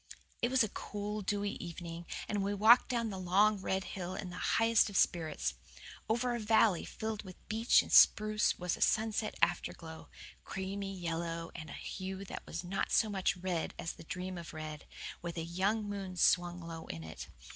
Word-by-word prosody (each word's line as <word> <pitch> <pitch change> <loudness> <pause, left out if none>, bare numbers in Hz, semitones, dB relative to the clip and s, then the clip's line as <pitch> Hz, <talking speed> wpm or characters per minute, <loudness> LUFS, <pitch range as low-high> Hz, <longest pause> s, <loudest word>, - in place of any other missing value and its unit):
It 240 - +2
was 260 -1 +4
a 220 - -1
cool, 210 +1 -4
dewy 205 0 -1
evening, 170 0 -7 0.2
and 205 -1 -1
we 200 +1 -1
walked 220 +5 +7
down 235 -3 0
the 190 - -5
long, 200 +3 +3
red 190 0 -1
hill 185 -1 -5
in 185 -3 -5
the 175 - -7 0.2
highest 225 -1 +4
of 200 - -2
spirits. 155 - +1 0.6
Over 240 +2 +1
a 240 - -2
valley 215 -4 +3
filled 220 -1 -4
with 185 -2 -13
beech 225 +2 +4
and - - -10
spruce 215 0 +6
was 180 -1 -1
a - - -12
sunset 220 -1 +1
afterglow 165 -2 -1 0.3
creamy 195 0 -4
yellow 165 -1 -3
and 155 - -8
a - - -7
hue 190 0 -5
that - - -6
was 170 +2 -4
not 185 +2 -2
so 220 - +4
much 190 -3 0
red 180 -2 -2
as 165 - -4
the - - -12
dream 180 +2 -5
of 165 -1 -9
red, 155 -1 -6 0.4
with 170 0 -5
a 165 - -1
young 195 +6 0
moon 195 -3 -5
swung 175 0 +3
low 165 -1 -7
in 80 0 -6
it. 80 0 -8
190 Hz, 190 wpm, -33 LUFS, 170-210 Hz, 0.6 s, walked